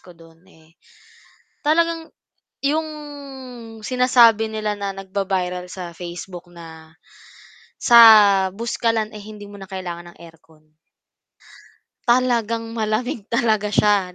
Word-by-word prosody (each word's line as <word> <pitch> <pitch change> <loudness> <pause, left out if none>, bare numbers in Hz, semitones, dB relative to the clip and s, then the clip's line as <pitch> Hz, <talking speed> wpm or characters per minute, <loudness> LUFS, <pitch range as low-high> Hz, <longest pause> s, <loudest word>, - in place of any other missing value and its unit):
ko 180 -2 -17
dun 165 0 -19
eh, 160 -2 -23 0.9
talagang 330 +1 +1 0.5
yung 310 +3 0 0.9
sinasabi 230 -2 +3
nila 215 -1 -2
na 200 -1 -4
nagba-viral 190 -2 -3
sa 175 -3 -8
Facebook 175 +1 -8
na 160 -2 -13 0.9
sa 235 - +5 0.5
Buskalan 225 +1 -2
eh, 210 - -9
hindi 210 0 -11
mo 205 -1 -12
na 190 - -10
kailangan 175 -3 -7
ng - - -23
aircon. 160 -2 -18 1.4
Talagang 230 -2 +1
malamig, 220 0 -3
talaga 220 -3 +1
siya 205 -3 +2
205 Hz, 105 wpm, -21 LUFS, 180-230 Hz, 1.4 s, sa